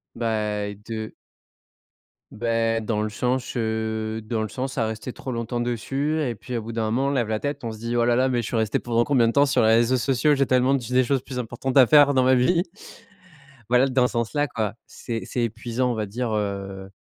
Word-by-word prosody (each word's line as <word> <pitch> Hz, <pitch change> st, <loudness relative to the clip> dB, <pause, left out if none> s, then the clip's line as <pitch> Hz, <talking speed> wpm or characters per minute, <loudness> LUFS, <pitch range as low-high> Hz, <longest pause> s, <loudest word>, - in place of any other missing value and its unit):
bah 105 Hz, -2 st, -2 dB
de 110 Hz, -1 st, -5 dB, 1.2 s
bah, 115 Hz, 0 st, 0 dB
dans 105 Hz, -1 st, -1 dB
le 110 Hz, -, -2 dB
sens, 125 Hz, +5 st, -2 dB
heu, 110 Hz, -1 st, -2 dB
dans 110 Hz, 0 st, -2 dB
le 110 Hz, -, -3 dB
sens 130 Hz, +5 st, -4 dB
à 110 Hz, -, +1 dB
rester 110 Hz, +3 st, -5 dB
trop 130 Hz, -, -6 dB
longtemps 115 Hz, 0 st, -3 dB
dessus 135 Hz, +6 st, -1 dB
et 120 Hz, -, -2 dB
puis, 120 Hz, +2 st, -6 dB
au -, -, -3 dB
bout 115 Hz, -, -6 dB
d'un 115 Hz, -1 st, -1 dB
moment, 125 Hz, +5 st, +1 dB
on -, -, +1 dB
lève 125 Hz, -5 st, 0 dB
la 110 Hz, 0 st, -1 dB
tête, 145 Hz, +1 st, -4 dB
on 115 Hz, -, -3 dB
se 110 Hz, -, -8 dB
dit: 115 Hz, +2 st, -3 dB
«Oh 120 Hz, -, +3 dB
là 120 Hz, 0 st, +3 dB
là, 130 Hz, +2 st, +2 dB
mais 120 Hz, -2 st, +1 dB
je 115 Hz, -, -5 dB
suis -, -, -3 dB
resté 110 Hz, -2 st, +1 dB
pendant 120 Hz, -1 st, +1 dB
combien 125 Hz, -3 st, +3 dB
de -, -, +2 dB
temps 140 Hz, 0 st, +5 dB
sur 140 Hz, -, +2 dB
les 110 Hz, -, +4 dB
réseaux 120 Hz, +3 st, +3 dB
sociaux? 135 Hz, +4 st, +2 dB
J'ai 140 Hz, -1 st, +2 dB
tellement 130 Hz, +1 st, +3 dB
d 135 Hz, -3 st, 0 dB
des 130 Hz, 0 st, +3 dB
choses 135 Hz, +1 st, 0 dB
plus 130 Hz, 0 st, -8 dB
importantes 125 Hz, +2 st, -2 dB
à 130 Hz, -, +9 dB
faire 145 Hz, +2 st, +6 dB
dans 130 Hz, -, +4 dB
ma 130 Hz, +1 st, +4 dB
vie». 165 Hz, +8 st, +3 dB, 1.1 s
Voilà, 125 Hz, +2 st, +4 dB
dans 130 Hz, -1 st, +2 dB
ce -, -, -9 dB
sens-là, 125 Hz, +5 st, 0 dB
quoi. 110 Hz, -5 st, -2 dB
C'est 115 Hz, -2 st, -5 dB
c'est 120 Hz, -, -2 dB
épuisant 115 Hz, +2 st, -1 dB
on -, -, -1 dB
va 110 Hz, -1 st, -2 dB
dire, 120 Hz, +3 st, -3 dB
heu 100 Hz, -2 st, -4 dB
120 Hz, 235 wpm, -24 LUFS, 110-130 Hz, 1.2 s, à